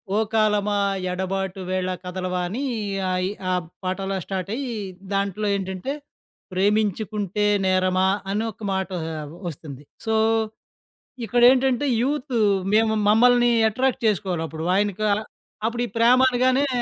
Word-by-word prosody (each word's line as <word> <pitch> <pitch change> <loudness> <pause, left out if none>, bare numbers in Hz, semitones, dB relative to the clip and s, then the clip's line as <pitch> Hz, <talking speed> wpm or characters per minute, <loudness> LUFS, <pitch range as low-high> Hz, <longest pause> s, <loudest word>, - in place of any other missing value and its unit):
ఓ - - +2 0.2
కాలమా 210 -1 +2 0.3
ఎడబాటు 190 +1 -3
వేళ 185 0 0 0.2
కథలవా' 180 0 -3
అని 255 +8 -3 0.5
ఆయి 185 +1 0 0.2
ఆ - - +2 0.3
పాట 185 +1 -1
అలా 195 0 -1
స్టార్ట్ 190 -1 -4
అయ్యి, 255 -3 -4 0.4
దాంట్లో 200 +1 -1
ఏంటంటే 190 +6 -3 0.6
'ప్రేమించుకుంటే 210 +1 0 0.2
నేరమా' 185 0 +2 0.2
అని 210 +2 0
ఒక 215 - -15
మాటా 190 -1 -2 0.5
వస్తుంది. 145 -2 -10 0.2
సో, 220 0 +1 1.1
ఇక్కడేంటంటే 250 +3 +4 0.2
యూతు 275 -1 -1 0.4
మేము, 220 0 +3
మమ్మల్ని 240 +2 +5 0.2
అట్రాక్ట్ 260 +2 0
చేసుకోవాలి. 190 -5 0
అప్పుడు 160 +2 -6
ఆయనకా 205 +1 0 0.6
అప్పుడు 235 +1 -1
ఈ - - -10
ప్రేమ 240 +2 +5
అనగానే 255 +3 +2
205 Hz, 120 wpm, -23 LUFS, 185-240 Hz, 1.1 s, మమ్మల్ని